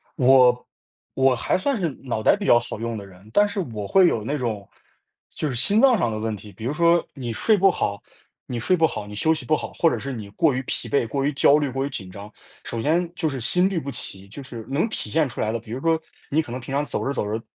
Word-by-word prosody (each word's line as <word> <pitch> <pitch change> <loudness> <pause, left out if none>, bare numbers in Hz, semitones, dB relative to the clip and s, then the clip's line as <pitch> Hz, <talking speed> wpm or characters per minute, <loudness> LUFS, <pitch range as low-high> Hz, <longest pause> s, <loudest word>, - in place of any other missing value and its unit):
我 125 -1 +5 0.5
我 135 -1 +3
还 120 - 0
算 275 +9 0
是 180 -7 -1
脑 120 -4 -2
袋 - - +5
比 200 0 -5
较 120 - +6
好 120 -2 -7
用 115 0 -3
的 100 - -8
人， 95 +2 -16
但 205 +7 +5
是 205 - -4
我 105 -2 -5
会 190 - +5
有 110 -9 0
那 145 +7 -2
种， 110 -6 -3 0.7
就 155 - -2
是 125 - -3
心 200 - +2
脏 260 -4 +6
上 120 - 0
的 110 - -3
问 110 0 -2
题。 105 +1 -12
比 105 +4 -9
如 130 - -1
说， 170 +1 +3
你 125 -4 -5
睡 215 - +3
不 195 0 +5
好 100 -9 -2 0.5
你 120 - -3
睡 185 +11 +2
不 165 -2 +3
好、 105 - -6
你 105 - -8
休 160 +10 +2
息 155 -5 -6
不 155 - +3
好， - - -5
或 165 - +3
者 - - -1
是 140 - -5
你 110 -5 -7
过 155 - +2
于 130 - -1
疲 115 - -3
惫、 120 -1 +1
过 135 +4 -2
于 145 - +1
焦 140 +1 +5
虑、 145 -2 0
过 135 +2 -1
于 - - -3
紧 100 -9 -6
张， 100 +2 -10 0.3
首 115 - -4
先 165 +5 +1
就 160 - 0
是 135 -2 -4
心 180 +10 +2
律 190 -4 -1
不 140 - -6
齐， 100 -6 -7
就 110 +8 -9
是 120 -4 -9
能 145 +10 +1
体 - - -4
现 160 -2 +2
出 120 - -9
来 110 - 0
的， 115 - -2
比 110 -1 -13
如 125 - -3
说， 165 0 +2 0.3
你 155 +3 +2
可 155 - -9
能 125 - -4
平 130 +2 -7
常 145 +1 +1
走 - - -3
着 140 - -1
走 120 - -2
着 110 +2 -3
130 Hz, 300 characters per minute, -23 LUFS, 110-160 Hz, 0.7 s, 较